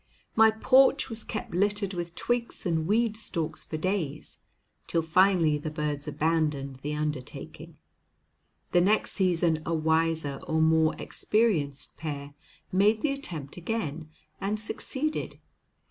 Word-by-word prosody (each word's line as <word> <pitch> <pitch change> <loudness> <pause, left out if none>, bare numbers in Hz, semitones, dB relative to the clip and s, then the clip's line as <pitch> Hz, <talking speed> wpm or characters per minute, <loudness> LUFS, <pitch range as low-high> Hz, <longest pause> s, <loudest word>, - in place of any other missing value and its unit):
My 220 0 +7
porch 260 +6 +4
was 225 -1 -6
kept 215 - -5
littered 200 +1 +1
with 170 -1 -5
twigs 240 -3 -2
and 160 -2 0
weed 220 +2 +2
stalks 165 -7 -3
for 155 - -5
days, 160 -4 -3 0.5
till 165 - +1
finally 165 -2 +4
the 155 - -4
birds 150 -1 -3
abandoned 150 -4 0
the 150 +3 -4
undertaking. 150 -4 -5 0.9
The 175 - +5
next 205 +4 +2
season 170 -4 +1
a 165 - -1
wiser 160 -3 +1
or 160 -1 +1
more 160 0 +4
experienced 165 -12 0
pair 145 -2 -5 0.4
made 205 +4 +3
the 300 - +1
attempt 170 - -5
again, 165 -5 -3 0.3
and 210 +2 -1
succeeded. 275 +7 -3
165 Hz, 130 wpm, -28 LUFS, 155-210 Hz, 0.9 s, My